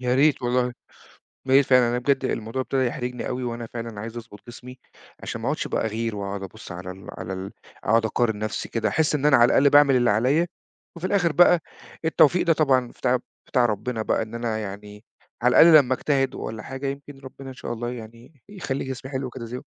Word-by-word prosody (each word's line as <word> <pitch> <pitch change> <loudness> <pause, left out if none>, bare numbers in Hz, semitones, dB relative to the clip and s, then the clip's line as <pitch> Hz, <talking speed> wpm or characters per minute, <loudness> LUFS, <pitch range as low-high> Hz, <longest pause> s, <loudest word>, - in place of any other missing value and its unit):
يا 125 0 0
ريت 140 0 +3
والله، 125 0 +1
يا 125 - -5 0.8
ريت 140 +1 +6
فعلًا 125 -2 +4
لإن 125 - 0
بجد 135 +1 +1
الموضوع 115 +1 -3
ابتدى 130 0 0
يحرِجني 125 0 -4
أوي، 125 0 -3
وأنا 120 -1 -4
فعلًا 115 -3 -6
عايز 115 +2 -7
أضبُط 115 -3 -10
جسمي، 125 +1 -11 0.4
عشان 115 - -6
ما 115 - -3
أقعُدش 145 +2 -1
بقى - - -1
أغِير 110 0 -2
واقعُد 100 -1 -5
أبُصّ 95 - -10
على 90 +1 -7
ال 95 +1 -12
على 95 - -5
ال 95 +1 -6 0.3
أقعُد 115 +2 +3
أقارن 110 -1 0
نفسي 110 0 -4
كده، 115 - -1
أحس 155 -1 +1
إن 145 -1 -1
أنا 150 -4 +6
على 120 - +7
الأقل 140 +3 +4
باعمل 145 -1 +6
اللي 120 -1 +3
عليَّ، 130 +11 +2 0.5
وفي 170 +2 -3
الآخر 180 -5 +2
بقى 175 +2 +5 0.5
التوفيق 160 +2 +4
ده 165 - +4
طبعًا 135 -5 +2
بتاع 130 +1 0 0.3
بتاع 125 -3 +2
ربنا 115 +1 -2
بقى 110 - 0
إن 110 +1 -6
أنا 115 -2 -2
يعني 105 0 -8 0.4
على 125 +1 +4
الأقل 165 -1 +9
لمّا 130 - 0
أجتهد 135 -1 0
والَّا 110 -1 -6
حاجة 135 +1 -5
يمكن 140 0 -7
ربنا 135 0 -10
إن - - -8
شاء 120 - -6
الله 120 +1 -4
يعني 115 +4 -11
يخلّي 175 -9 -4
جسمي 130 +1 -7
حلو 130 -1 -3
كده 120 -1 -8
زيهم. 125 +2 -7
125 Hz, 210 wpm, -24 LUFS, 115-135 Hz, 0.8 s, الأقل